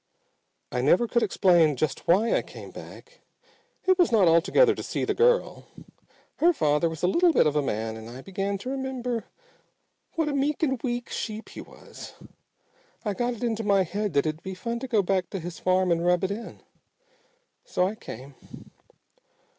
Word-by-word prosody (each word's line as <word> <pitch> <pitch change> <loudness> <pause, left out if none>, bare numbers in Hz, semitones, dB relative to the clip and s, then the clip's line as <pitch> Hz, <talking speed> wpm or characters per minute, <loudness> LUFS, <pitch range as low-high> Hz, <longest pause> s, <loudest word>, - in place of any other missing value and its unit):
I 125 - -1
never 175 - +3
could 235 +1 +1
explain 175 -7 +3
just 130 0 -2
why 200 +7 +3
I - - +2
came - - -11
back. - - -12 0.7
It 375 0 +3
was 350 - +4
not 210 -6 +5
altogether 190 - +4
to - - -6
see - - -3
the - - 0
girl. 485 +1 +1 0.7
Her 345 +2 +4
father 150 - +1
was 160 0 -8
a - - +4
little 340 - +4
bit - - +4
of 150 -1 +1
a 150 - +3
man 110 -4 -3
and 110 0 -9
I 130 +3 -10
began 195 +1 -3
to 250 +7 -6
remember 255 -4 -3 0.9
what 325 -2 0
a 295 - -1
meek 280 +3 0
and 265 -6 0
weak 240 -1 -3
sheep 220 0 -5
he - - -9
was. - - -12 0.9
I 205 - 0
got 240 +4 -1
it 230 - -8
into 225 -2 -1
my 200 -2 +3
head 205 +2 -3
that 140 +1 +2
it'd 155 +1 -3
be 190 0 -6
fun 235 +6 -4
to 265 - -5
go 220 -5 +2
back 185 0 0
to 195 - -4
his 170 -1 -7
farm 185 0 +2
and 170 0 +1
rub 180 0 +2
it 190 - 0
in. 225 +3 -7 1.0
So 180 - 0
I 200 - -3
came. 135 - -10
200 Hz, 190 wpm, -26 LUFS, 170-245 Hz, 1.0 s, not